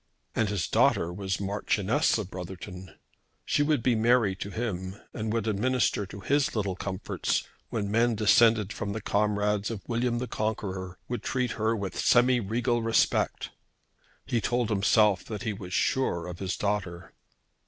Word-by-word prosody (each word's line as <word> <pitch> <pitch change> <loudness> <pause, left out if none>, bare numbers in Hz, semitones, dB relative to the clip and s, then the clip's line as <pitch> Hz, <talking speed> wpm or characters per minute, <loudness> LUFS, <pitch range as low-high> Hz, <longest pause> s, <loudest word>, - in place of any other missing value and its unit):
And 110 -2 +1
his 95 -8 -1
daughter 85 +1 +2
was 95 0 -3
Marchioness 105 +8 +1
of 100 -4 -5
Brotherton. 90 0 -8 0.5
She - - +1
would 145 -5 +2
be 125 - +3
Mary 115 -3 +3
to 100 - -5
him, 95 -4 -4 0.2
and 110 -1 -3
would 115 -1 -1
administer 110 -1 +1
to 100 +2 -9
his 145 +7 +1
little 100 -4 -1
comforts 95 0 -2 0.3
when 100 -2 -2
men 115 +1 +3
descended 110 -1 +4
from 100 -1 -4
the 110 - -4
comrades 105 0 +1
of 110 -4 -6
William 120 0 0
the 125 - -2
Conqueror 95 -5 -3
would 120 - -3
treat 125 -2 -1
her 110 +1 0
with 100 -4 -4
semi 125 +1 +4
regal 120 +3 0
respect. 115 0 +1 0.7
He 115 - 0
told 120 +1 0
himself 105 -1 +3
that 110 0 -6
he 110 -3 -1
was 95 -2 -9
sure 90 -3 +1
of 90 -1 -7
his 95 -1 -2
daughter. 90 -4 -3
105 Hz, 160 wpm, -28 LUFS, 95-115 Hz, 0.7 s, descended